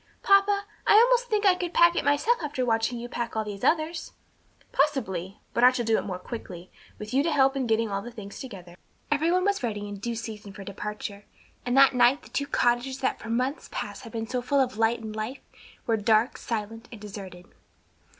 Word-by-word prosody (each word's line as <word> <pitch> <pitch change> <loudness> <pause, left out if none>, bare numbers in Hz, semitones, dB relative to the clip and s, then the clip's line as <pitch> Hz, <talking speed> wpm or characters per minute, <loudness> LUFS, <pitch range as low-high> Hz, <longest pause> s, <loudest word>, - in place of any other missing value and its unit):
"Papa, 400 0 +4 0.2
I - - +6
almost 485 +3 +6
think 425 -3 0
I 385 - +7
could 355 -1 -4
pack 340 0 +6
it - - 0
myself 290 +12 +2
after 285 -4 -2
watching 225 +1 +1
you 235 +1 -6
pack 240 -1 -4
all 220 0 -1
these 200 -2 -7
others." 325 +1 0 0.6
"Possibly; 210 - 0 0.2
but 235 - +1
I 250 - +9
shall 245 -2 -2
do 225 0 +3
it - - -5
more 185 -2 -4
quickly, 180 -3 -8 0.3
with 210 +3 -8
you 270 - +4
to 325 +3 0
help 270 -2 +3
in 265 -3 -1
getting 225 -1 +1
all 195 0 -1
the 240 - -8
things 210 -4 -9
together." 180 -9 -9 0.4
Every 310 +3 +2
one 365 +1 +2
was 400 0 +1
ready 210 -4 -3
in 205 0 -6
due 235 +3 -3
season 215 -3 -7
for 200 - -9
departure, 205 +1 -6 0.4
and 245 +2 +1
that 275 0 +7
night 250 +3 +4
the - - -14
two 280 - -2
cottages 245 +2 +1
that 260 - 0
for 225 - -9
months 255 +5 -1
past - - -5
had 230 - -10
been 225 0 -3
so 250 +2 -2
full 280 +3 +1
of 255 -3 +1
light 225 +1 +3
and 215 -1 -7
life, 220 +5 -4 0.4
were 225 -1 +1
dark, 220 +3 +2
silent 225 +1 -5
and 230 - -9
deserted. 195 -4 -9
240 Hz, 220 wpm, -27 LUFS, 210-280 Hz, 0.6 s, I